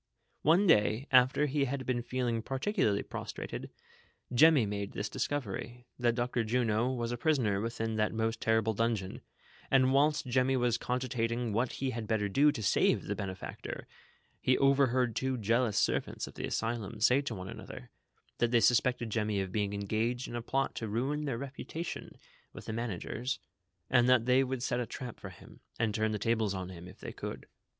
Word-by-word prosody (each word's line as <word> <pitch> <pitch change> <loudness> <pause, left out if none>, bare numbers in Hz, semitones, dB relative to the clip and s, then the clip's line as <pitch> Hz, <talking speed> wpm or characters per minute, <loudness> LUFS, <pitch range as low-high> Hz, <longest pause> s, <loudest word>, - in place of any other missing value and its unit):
One 170 +6 +4
day, 110 - +3
after 130 +3 +5
he 140 0 +1
had 135 0 -3
been 125 -2 0
feeling 120 -1 -1
particularly 135 - 0
pros - - -6
trated, - - -6 0.6
Jemmy 145 -1 +6
made 100 0 -4
this 105 0 -3
discovery, 120 -2 -3
that 120 -1 +2
Dr. 120 -1 0
Juno 115 +1 +1
was 120 -2 -2
a 120 - -2
prisoner 120 -9 +1
within 115 -1 -2
that 105 0 +1
most 115 0 -1
terrible 110 0 +2
dungeon; 110 -3 -1 0.5
and 130 -1 +4
whilst 145 +2 +3
Jemmy 130 +1 +2
was 120 -2 +1
cogitating 125 -2 -1
what 120 +4 0
he 135 -1 -2
had 115 -2 -5
better 105 -2 +1
do 140 +9 +4
to 110 - -5
save 95 - +3
the - - -2
benefactor, 95 -1 -6 0.5
he 130 - +2
overheard 130 -4 +3
two 130 +1 -1
jealous 115 0 +1
servants - - 0
of - - -11
the - - -4
asylum 115 -1 -3
say 125 +5 +4
to 135 -5 -4
one 95 -1 -7
another, 60 - -9 0.5
that 120 - +3
they 120 0 +4
suspected 120 -1 +2
Jemmy 105 -2 0
of 95 -1 -3
being 100 0 0
engaged 110 +5 -1
in 120 - -6
a 120 - -2
plot 135 +3 -1
to 110 - -3
ruin 135 +8 -1
their 135 -5 -2
reputation 140 +5 -6 0.4
with - - -10
the 110 - -4
mana' 115 -4 -2
gers, 125 +9 -3 0.5
and 125 -1 +4
that 125 -3 +5
they 125 +1 +4
would 130 -1 -3
set - - 0
a 120 - -2
trap 125 -3 -7
for 95 - -7
him, 90 - -15 0.2
and 110 -2 0
turn 110 +1 +1
the 105 - -1
tables 110 -1 0
on 95 -1 -4
him, 90 -1 -9
if - - -13
they - - -7
could. - - -6
120 Hz, 190 wpm, -31 LUFS, 110-130 Hz, 0.6 s, Jemmy